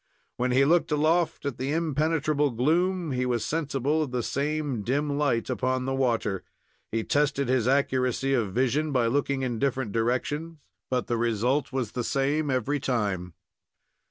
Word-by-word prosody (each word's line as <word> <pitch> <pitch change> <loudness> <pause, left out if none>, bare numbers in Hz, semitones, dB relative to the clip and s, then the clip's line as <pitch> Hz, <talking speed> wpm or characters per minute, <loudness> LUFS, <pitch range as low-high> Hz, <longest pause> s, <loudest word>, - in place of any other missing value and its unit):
When 125 +1 0
he 135 +2 +4
looked 165 +2 +3
aloft 155 +2 +1
at 140 -4 -3
the 135 +2 -1
impenetrable 155 -2 +1
gloom, 165 +7 +1
he 125 -1 0
was 120 -3 0
sensible 150 -1 0
of 150 - -1
the 125 -1 -2
same 145 -3 -1
dim 140 +6 0
light 140 -6 +1
upon 130 0 -1
the 135 - -1
water. 115 -7 0 0.5
He 115 0 -1
tested 140 -1 +1
his 125 -2 +1
accuracy 130 -1 +1
of 115 -7 +1
vision 135 +7 +1
by 125 -4 +2
looking 135 +2 0
in 120 -3 -2
different 130 -5 -1
directions, 130 +9 -1 0.3
but 125 -1 0
the 120 - -1
result 120 +5 0
was 130 -5 -2
the 125 - -3
same 140 +4 0
every 130 +3 0
time. 100 - -2
135 Hz, 160 wpm, -27 LUFS, 120-150 Hz, 0.5 s, he